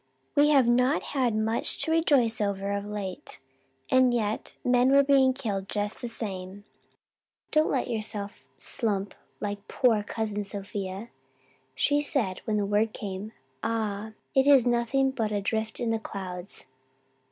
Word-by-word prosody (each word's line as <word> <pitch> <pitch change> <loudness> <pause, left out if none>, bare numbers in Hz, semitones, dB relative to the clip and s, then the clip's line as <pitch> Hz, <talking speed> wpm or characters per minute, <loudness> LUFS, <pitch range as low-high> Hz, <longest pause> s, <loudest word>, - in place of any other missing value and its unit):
"We 290 0 +5
have 275 -4 +5
not 250 +5 +3
had 250 -5 +1
much 220 +1 0
to 320 - -1
rejoice 275 -9 +3
over 200 -1 -1
of 200 0 -2
late 200 -3 -6 0.5
and 255 -1 +5
yet 220 -3 -2
men 250 +1 +4
were 280 +1 +6
being 270 -1 +5
killed 205 -7 -3
just 205 0 -3
the 245 - -3
same. 195 -4 -5 0.9
Do 305 - +4
not - - -1
let 260 - 0
yourself 210 -3 -2
slump 205 -4 -1 0.3
like 205 -1 -4
poor 235 -5 +3
Cousin 210 0 -3
Sophia. 200 +1 -5 0.7
She 290 0 +2
said, 240 -10 -1
when 215 -3 0
the 205 - +1
word 210 +2 +1
came, 200 +1 -6 0.3
'Ah, 220 -1 -2 0.2
it 265 +1 +4
is 275 -4 +7
nothing 245 +3 +2
but 225 -5 -2
a 205 -1 -1
rift 220 0 -2
in 235 -1 0
the 225 - 0
clouds. 185 -3 -7
220 Hz, 150 wpm, -27 LUFS, 205-250 Hz, 0.9 s, is